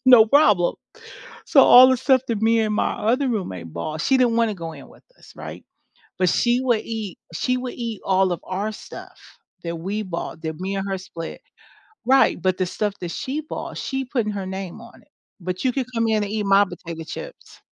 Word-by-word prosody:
no 245 Hz, -4 st, +9 dB
problem. 215 Hz, -, +4 dB, 0.7 s
So, 280 Hz, -, +6 dB
all 255 Hz, +1 st, +9 dB
the 260 Hz, -, +3 dB
stuff 260 Hz, -1 st, +3 dB
that 220 Hz, -2 st, -2 dB
me 225 Hz, 0 st, +4 dB
and 215 Hz, -1 st, 0 dB
my -, -, +1 dB
other 255 Hz, +6 st, +1 dB
roommate 95 Hz, -, -4 dB
bought, 155 Hz, -, -4 dB
she 265 Hz, -, +3 dB
didn't 240 Hz, -2 st, +3 dB
wanna 230 Hz, -3 st, +2 dB
go 165 Hz, -2 st, -7 dB
in -, -, -11 dB
with -, -, -19 dB, 0.2 s
us, -, -, -16 dB
right, -, -, -9 dB, 0.5 s
but 185 Hz, -1 st, +3 dB
she 240 Hz, +1 st, +2 dB
would 240 Hz, -4 st, +1 dB
eat 220 Hz, -5 st, -5 dB, 0.2 s
she 255 Hz, +9 st, 0 dB
would 250 Hz, 0 st, -5 dB
eat 230 Hz, -4 st, -5 dB
all 190 Hz, -1 st, +2 dB
of 175 Hz, -, -4 dB
our 200 Hz, +4 st, -3 dB
stuff -, -, -11 dB, 0.5 s
that 170 Hz, 0 st, -3 dB
we 200 Hz, +6 st, -3 dB
bought, 170 Hz, -3 st, -6 dB
that 160 Hz, -1 st, -4 dB
me 195 Hz, +1 st, -3 dB
and 195 Hz, 0 st, -3 dB
her 195 Hz, -, -1 dB
split. 170 Hz, -3 st, -8 dB, 0.6 s
Right, 265 Hz, -8 st, +4 dB
but 185 Hz, 0 st, +1 dB
the 185 Hz, -, +1 dB
stuff 205 Hz, +2 st, -2 dB
that 175 Hz, -2 st, -4 dB
she 280 Hz, +4 st, -3 dB
bought, 310 Hz, -, -7 dB
she 265 Hz, 0 st, -3 dB
putting 230 Hz, -5 st, -1 dB
her 195 Hz, -2 st, -4 dB
name 190 Hz, +2 st, -6 dB
on 235 Hz, 0 st, -15 dB
it. -, -, -29 dB, 0.3 s
But 180 Hz, +1 st, -4 dB
you 255 Hz, -, +2 dB
could 265 Hz, -1 st, -2 dB
come 230 Hz, 0 st, +1 dB
in 215 Hz, -1 st, +2 dB
and 205 Hz, -, -6 dB
eat 210 Hz, -2 st, -1 dB
my 195 Hz, +1 st, +5 dB
potato 170 Hz, -4 st, -8 dB
chips. -, -, -10 dB
210 Hz, 215 wpm, -22 LUFS, 185-245 Hz, 0.7 s, no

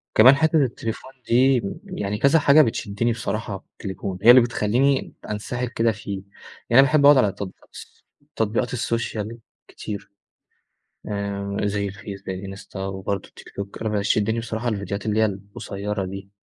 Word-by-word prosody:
كمان 130 Hz, +5 st, +8 dB
حتة 160 Hz, +2 st, +2 dB
التليفون 120 Hz, +1 st, -4 dB, 0.2 s
دي 125 Hz, +1 st, +4 dB, 0.2 s
يعني 105 Hz, -, -3 dB
كذا 140 Hz, +7 st, +4 dB
حاجة 145 Hz, +2 st, +6 dB
بتشدني 115 Hz, -2 st, 0 dB
بصراحة 110 Hz, -3 st, -3 dB
في -, -, -32 dB
التليفون، 95 Hz, -2 st, -5 dB
هي 115 Hz, -, +6 dB
اللي 125 Hz, -, +9 dB
بتخلّيني 120 Hz, +4 st, +1 dB, 0.2 s
أنسِحل 120 Hz, +4 st, -3 dB
كده 115 Hz, -1 st, +1 dB
فيه. 105 Hz, -2 st, -6 dB, 0.6 s
يعني 120 Hz, -, +6 dB
أنا -, -, +12 dB
باحب 145 Hz, +1 st, +4 dB
أقعد 145 Hz, -1 st, +8 dB
على 105 Hz, -6 st, +4 dB
تطبيقات 95 Hz, -1 st, -9 dB
الس -, -, -13 dB, 0.3 s
تطبيقات 115 Hz, +3 st, 0 dB
السوشيال 115 Hz, -2 st, -2 dB, 0.3 s
كتير، 100 Hz, -1 st, -7 dB, 1.0 s
آآ 100 Hz, -1 st, -3 dB
زي 100 Hz, -1 st, -1 dB
الFace، 100 Hz, 0 st, -9 dB
زي 95 Hz, 0 st, -4 dB
الInsta، 100 Hz, -, -13 dB
وبرضه 95 Hz, 0 st, -3 dB
الTikTok 100 Hz, -, -8 dB, 0.2 s
أنا 110 Hz, -, -1 dB
بيشدني 105 Hz, +2 st, +1 dB
بصراحة 115 Hz, +1 st, -3 dB
الفيديوهات 100 Hz, -1 st, -3 dB
اللي 110 Hz, +1 st, +1 dB
هي 110 Hz, -, +5 dB
القصيرة 100 Hz, 0 st, -5 dB
دي. 95 Hz, +1 st, -8 dB
110 Hz, 155 wpm, -23 LUFS, 100-120 Hz, 1.0 s, أنا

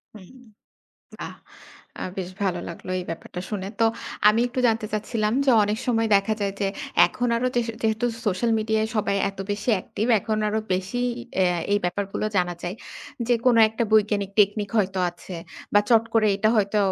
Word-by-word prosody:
হুম। 210 Hz, +5 st, -14 dB, 0.8 s
বাহ! -, -, -6 dB, 0.6 s
আ -, -, -5 dB
বেশ 185 Hz, -2 st, -3 dB
ভালো 185 Hz, -3 st, 0 dB
লাগলো 170 Hz, +2 st, -8 dB
এই 180 Hz, -, -4 dB
ব্যাপারটা 165 Hz, +2 st, -6 dB
শুনে। 195 Hz, -3 st, -3 dB
তো -, -, +5 dB, 0.4 s
আমি 215 Hz, +2 st, +4 dB
একটু 255 Hz, +1 st, -3 dB
জানতে 225 Hz, -1 st, +1 dB
চাচ্ছিলাম 215 Hz, 0 st, -1 dB
যে 270 Hz, -, +4 dB
অনেক 210 Hz, +1 st, 0 dB
সময় 225 Hz, -2 st, +1 dB
দেখা 200 Hz, +2 st, 0 dB
যায় 200 Hz, -1 st, 0 dB
যে 200 Hz, -, +1 dB, 0.4 s
এখন 245 Hz, 0 st, -2 dB
আরো 250 Hz, -, 0 dB
যেহ 240 Hz, -1 st, +2 dB, 0.2 s
যেহেতু 220 Hz, +1 st, +1 dB, 0.2 s
সোশ্যাল 205 Hz, +4 st, +1 dB
মিডিয়ায় 220 Hz, 0 st, 0 dB
সবাই 200 Hz, -1 st, +1 dB
এত 195 Hz, -, -23 dB
বেশি 205 Hz, +3 st, -3 dB
অ্যাক্টিভ 205 Hz, +3 st, -3 dB
এখন 215 Hz, +2 st, -2 dB
আরো 215 Hz, +1 st, 0 dB, 0.2 s
বেশি 190 Hz, +6 st, -3 dB, 0.4 s
অ্যাঁ 180 Hz, -2 st, +2 dB
এই 205 Hz, -, +4 dB
ব্যাপারগুলো 195 Hz, +3 st, -2 dB
জানা 175 Hz, -1 st, +1 dB
যায়। 175 Hz, +2 st, -3 dB, 0.5 s
যে 245 Hz, -, +5 dB
কোন 250 Hz, -2 st, +5 dB
একটা 220 Hz, +2 st, -3 dB
বৈজ্ঞানিক 210 Hz, -2 st, +3 dB
টেকনিক 205 Hz, 0 st, +3 dB
হয়তো 190 Hz, -2 st, 0 dB
আছে 175 Hz, +1 st, -11 dB, 0.4 s
বা 205 Hz, -, +7 dB
চট 230 Hz, -1 st, +5 dB
করে 220 Hz, -1 st, +4 dB
এটা 215 Hz, +2 st, +2 dB
হয়তো 210 Hz, 0 st, +2 dB
210 Hz, 175 wpm, -24 LUFS, 195-220 Hz, 0.8 s, বা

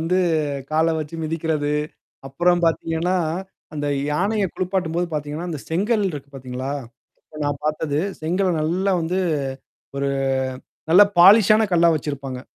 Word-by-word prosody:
வந்து 175 Hz, +3 st, +1 dB, 0.5 s
கால 160 Hz, +1 st, +2 dB
வச்சு 155 Hz, +2 st, -5 dB
மிதிக்கிறது. 155 Hz, -2 st, -1 dB, 0.5 s
அப்புறம் 175 Hz, +6 st, +1 dB
பார்த்தீங்கன்னா, 165 Hz, +2 st, 0 dB, 0.6 s
அந்த 145 Hz, -1 st, -3 dB, 0.2 s
யானைய 200 Hz, +6 st, +1 dB
குளிப்பாட்டும்போது 180 Hz, -2 st, -1 dB
பார்த்தீங்கன்னா, 150 Hz, +3 st, -4 dB
அந்த 150 Hz, -4 st, -5 dB
செங்கல் 205 Hz, +6 st, +1 dB
இருக்கு 140 Hz, -2 st, -8 dB
பார்த்தீங்களா? 130 Hz, +1 st, -5 dB, 0.5 s
இப்ப 155 Hz, -, -14 dB
நான் 145 Hz, -1 st, -2 dB
பார்த்தது. 150 Hz, -1 st, -1 dB, 0.2 s
செங்கல 180 Hz, +4 st, +1 dB
நல்லா 185 Hz, +5 st, 0 dB
வந்து 170 Hz, +3 st, -1 dB, 0.8 s
ஒரு 140 Hz, 0 st, 0 dB, 0.8 s
நல்ல 185 Hz, +5 st, +8 dB, 0.2 s
பாலிஷான 215 Hz, +4 st, +7 dB
கல்லா 170 Hz, -1 st, +5 dB
வச்சிருப்பாங்க. 140 Hz, -3 st, -4 dB
160 Hz, 120 wpm, -22 LUFS, 145-180 Hz, 0.8 s, நல்ல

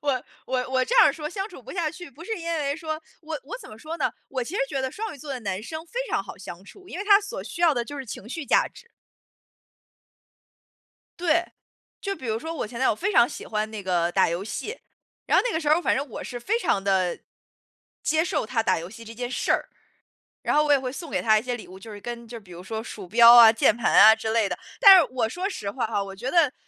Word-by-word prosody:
我- 270 Hz, -4 st, -1 dB, 0.2 s
我 255 Hz, 0 st, -2 dB
我 260 Hz, -1 st, +2 dB
这 -, -, -2 dB
样 470 Hz, -, +9 dB
儿 -, -, +3 dB
说 300 Hz, -2 st, -5 dB
“相 390 Hz, +1 st, -4 dB
处 -, -, -13 dB
不 -, -, -9 dB
下 335 Hz, -4 st, -1 dB
去”， 340 Hz, 0 st, -11 dB
不 310 Hz, +6 st, -13 dB
是 445 Hz, +1 st, -3 dB
因 335 Hz, -, -8 dB
为 285 Hz, -1 st, -1 dB
说 315 Hz, -1 st, -5 dB, 0.2 s
我 310 Hz, -1 st, -5 dB
我 445 Hz, -, -7 dB
怎 -, -, -12 dB
么 215 Hz, -, -12 dB
说 320 Hz, +5 st, -6 dB
呢？ 300 Hz, -, 0 dB, 0.2 s
我 260 Hz, -2 st, -3 dB
其 310 Hz, -, -7 dB
实 440 Hz, -, 0 dB
觉 270 Hz, -, -2 dB
得 260 Hz, 0 st, -2 dB
双 440 Hz, +6 st, -5 dB
鱼 285 Hz, -, -13 dB
座 290 Hz, +1 st, -9 dB
的 255 Hz, -, -5 dB
男 195 Hz, -1 st, -4 dB
生 315 Hz, +6 st, -7 dB
非 485 Hz, -, -4 dB
常 -, -, 0 dB
好 -, -, -10 dB
相 185 Hz, -1 st, -10 dB
处， 370 Hz, -, -16 dB
因 360 Hz, -, -7 dB
为 400 Hz, -, -3 dB
他 405 Hz, -1 st, +6 dB
所 430 Hz, +5 st, -6 dB
需 345 Hz, -, -8 dB
要 330 Hz, -, +6 dB
的 240 Hz, -1 st, -1 dB
就 290 Hz, +4 st, -8 dB
是 270 Hz, -, -5 dB
情 210 Hz, +1 st, -8 dB
绪 320 Hz, +4 st, -5 dB
价 -, -, +3 dB
值。 470 Hz, -, -17 dB, 2.3 s
对， 340 Hz, 0 st, +2 dB, 0.6 s
就 395 Hz, -1 st, -3 dB
比 260 Hz, -, -10 dB
如 220 Hz, -1 st, -1 dB
说 320 Hz, +6 st, -5 dB
我 305 Hz, -, -4 dB
前 235 Hz, +2 st, -8 dB
男 260 Hz, -, +3 dB
友 220 Hz, -, +2 dB
非 395 Hz, -, -1 dB
常 235 Hz, -9 st, +5 dB
喜 -, -, -8 dB
欢 215 Hz, 0 st, -2 dB
那 210 Hz, -3 st, -6 dB
个 175 Hz, -2 st, 0 dB
打 190 Hz, -2 st, +3 dB
游 170 Hz, +3 st, -3 dB
戏， 420 Hz, -, -5 dB, 0.5 s
然 -, -, +3 dB
后 -, -, +4 dB
那 -, -, -1 dB
个 320 Hz, -, 0 dB
时 300 Hz, -, -2 dB
候， 315 Hz, +3 st, +4 dB
反 -, -, +1 dB
正 275 Hz, +2 st, -2 dB
我 -, -, -7 dB
是 245 Hz, -, -6 dB
非 420 Hz, -, 0 dB
常 195 Hz, -, 0 dB
地 190 Hz, -3 st, +1 dB, 0.8 s
接 315 Hz, +1 st, +2 dB
受 335 Hz, -, -1 dB
他 225 Hz, +1 st, 0 dB
打 185 Hz, -5 st, +2 dB
游 170 Hz, +2 st, -8 dB
戏 230 Hz, +3 st, -11 dB
这 225 Hz, 0 st, -10 dB
件 245 Hz, +1 st, -5 dB
事 -, -, -1 dB
儿。 -, -, 0 dB, 0.7 s
然 -, -, 0 dB
后 300 Hz, -, +4 dB
我 295 Hz, -, +3 dB
也 285 Hz, -, +5 dB
会 255 Hz, -1 st, -4 dB
送 315 Hz, +4 st, -8 dB
给 -, -, -1 dB
他 215 Hz, -1 st, +4 dB
一 -, -, -4 dB
些 250 Hz, 0 st, -3 dB
礼 220 Hz, -, -11 dB
物， 185 Hz, -, -11 dB
就 220 Hz, +3 st, -11 dB
是 205 Hz, -, -9 dB
跟 235 Hz, +1 st, -7 dB
就 230 Hz, 0 st, -9 dB
比 195 Hz, -, -20 dB
如 175 Hz, +1 st, -10 dB
说 220 Hz, +3 st, -4 dB
鼠 205 Hz, -5 st, -9 dB
标 235 Hz, +4 st, +8 dB
啊、 230 Hz, -2 st, +10 dB
键 225 Hz, -, +3 dB
盘 240 Hz, -, 0 dB
啊 220 Hz, -, +9 dB
之 220 Hz, 0 st, -3 dB
类 225 Hz, -3 st, +2 dB
的。 -, -, -4 dB, 0.2 s
但 395 Hz, -4 st, +10 dB
是 335 Hz, -, +4 dB
我 235 Hz, -4 st, 0 dB
说 365 Hz, -, -3 dB
实 205 Hz, -, -5 dB
话 240 Hz, +2 st, -2 dB
哈， 205 Hz, -2 st, -1 dB
我 195 Hz, 0 st, -8 dB
觉 240 Hz, +6 st, -5 dB
得， 330 Hz, -7 st, +4 dB
255 Hz, 295 characters per minute, -25 LUFS, 220-325 Hz, 2.3 s, 啊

